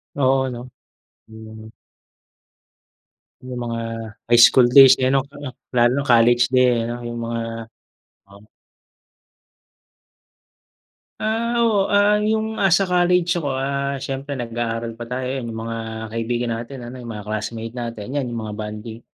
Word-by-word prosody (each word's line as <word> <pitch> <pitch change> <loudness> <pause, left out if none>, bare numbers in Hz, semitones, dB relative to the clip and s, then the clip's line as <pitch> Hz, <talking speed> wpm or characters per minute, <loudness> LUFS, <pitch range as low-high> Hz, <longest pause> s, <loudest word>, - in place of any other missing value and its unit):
Oo, 135 -1 +2
'no. 125 0 -8 0.6
Hmm. 110 0 -12 1.7
'Yung 125 -1 -7
mga 115 -1 -3 0.5
high 120 - +5
school 125 -2 +4
days 135 0 +9
eh, 130 - +3
ano. 135 0 +1
Oo, 140 -1 -9 0.2
lalo 120 -1 +4
na 140 - 0
college 120 -1 +4
day 125 -2 +3
ano, 120 +1 -5
'yung 120 0 -6
mga 115 0 -3 0.9
Oo. 100 +1 -17 2.8
Ah. 230 +2 -1
Oo, 210 -4 +2
ah, 205 +1 +4
'yung 220 +1 0
asa 195 0 +3
college 180 0 +2
ako, 150 -4 -2
ah, 140 +1 -2
siyempre 135 +2 -5
nag-aaral 115 -1 -4
pa 120 - -7
tayo, 125 0 -3
'yan 130 -2 -4
'yung 110 - -6
mga 115 0 -4 0.4
kaibigan 120 +1 -2
natin 120 +4 -7
ano, 125 - -9
'yung 120 -1 -7
mga 105 -2 -8
classmate 110 +2 -5
natin, 115 0 -6
'yan 140 -2 0
'yung 120 - -4
mga 105 -1 -6
bonding, 110 +1 -7
125 Hz, 140 wpm, -21 LUFS, 115-140 Hz, 2.8 s, days